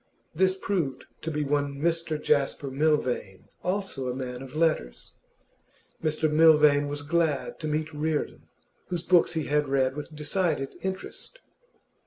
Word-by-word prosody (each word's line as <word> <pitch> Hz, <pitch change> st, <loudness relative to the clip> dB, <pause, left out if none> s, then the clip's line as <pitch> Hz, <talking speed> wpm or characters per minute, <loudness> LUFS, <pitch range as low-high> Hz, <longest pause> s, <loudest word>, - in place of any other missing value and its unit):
This 185 Hz, +2 st, +3 dB
proved 175 Hz, -9 st, -2 dB, 0.2 s
to 160 Hz, -, -3 dB
be 150 Hz, -1 st, -1 dB
one 145 Hz, 0 st, 0 dB
Mr 165 Hz, -1 st, 0 dB
Jasper 140 Hz, -2 st, +1 dB
Milvain, 130 Hz, -9 st, 0 dB
also 180 Hz, -9 st, -2 dB
a 125 Hz, -, -3 dB
man 125 Hz, -1 st, -5 dB
of 135 Hz, +1 st, -10 dB
letters. 155 Hz, -, 0 dB, 0.9 s
Mr 155 Hz, 0 st, +1 dB
Milvain 150 Hz, -2 st, +5 dB
was 145 Hz, 0 st, -4 dB
glad 160 Hz, -2 st, 0 dB
to 155 Hz, -, -3 dB
meet 155 Hz, +1 st, -2 dB
Reardon, 150 Hz, 0 st, -2 dB, 0.4 s
whose 175 Hz, -2 st, -3 dB
books 175 Hz, 0 st, +4 dB
he 160 Hz, -2 st, -1 dB
had 150 Hz, 0 st, +1 dB
read 135 Hz, -1 st, +2 dB
with 150 Hz, +1 st, -7 dB
decided 150 Hz, -2 st, -1 dB
interest. 190 Hz, -, -5 dB
150 Hz, 140 wpm, -27 LUFS, 140-165 Hz, 0.9 s, Milvain